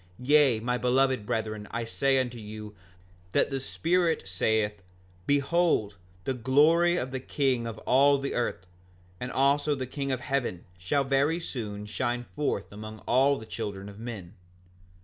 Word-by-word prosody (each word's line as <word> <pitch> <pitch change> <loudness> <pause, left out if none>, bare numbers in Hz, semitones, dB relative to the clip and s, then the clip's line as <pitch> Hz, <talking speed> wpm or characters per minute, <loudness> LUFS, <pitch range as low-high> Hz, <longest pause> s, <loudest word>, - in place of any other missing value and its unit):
Yea, 140 -4 +5
my 125 +2 -1
beloved 130 -2 +2
brethren, 110 -1 -2
I 115 0 -3
say 135 +4 +1
unto 125 -2 -1
you, 105 0 -8 0.6
that - - +2
the 135 - -1
Spirit 165 +4 0
saith: 105 +2 0 0.5
Behold 145 - +2 0.3
the 135 - -1
glory 155 +8 +4
of 130 -5 -3
the 130 - -3
King 130 -3 0
of 115 -2 -6
all 140 +2 +5
the 140 0 -3
earth; 120 -6 -2 0.5
and 125 +1 -4
also 145 +2 +2
the 130 -2 -3
King 140 +1 -3
of 130 -1 -2
heaven 125 -10 -2
shall 135 +11 +1
very 140 +5 +2
soon 105 -10 -5
shine 120 +3 -2
forth 145 -9 -2
among 110 +1 -8
all 135 +3 +4
the 110 - -9
children 105 -3 -5
of 100 +1 -12
men. 110 -6 -7
125 Hz, 155 wpm, -28 LUFS, 110-140 Hz, 0.6 s, Yea